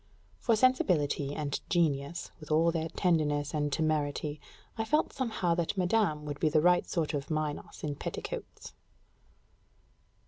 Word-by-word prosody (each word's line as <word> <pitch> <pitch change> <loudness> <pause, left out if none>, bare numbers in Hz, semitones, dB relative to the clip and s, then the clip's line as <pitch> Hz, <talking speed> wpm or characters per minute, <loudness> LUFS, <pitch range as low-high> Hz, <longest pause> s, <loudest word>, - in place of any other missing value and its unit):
For 230 - +3
sensibility 160 - +2
and 145 -2 -2
genius, 155 -2 0
with 155 - -11
all 160 +2 +4
their 165 -1 -2
tenderness 150 -5 +1
and 150 -1 0
temerity, 150 -1 -1 0.3
I 225 - -1
felt 300 +8 +1
somehow 220 -10 0
that 170 +3 -1
madame 180 -5 +1
would 145 -1 -5
be 155 - +3
the 155 - +4
right 175 +3 +3
sort 165 -4 -1
of 140 -1 -3
Minos 155 -2 -3
in 150 -2 -1
petticoats. - - -6
155 Hz, 140 wpm, -30 LUFS, 145-175 Hz, 0.3 s, all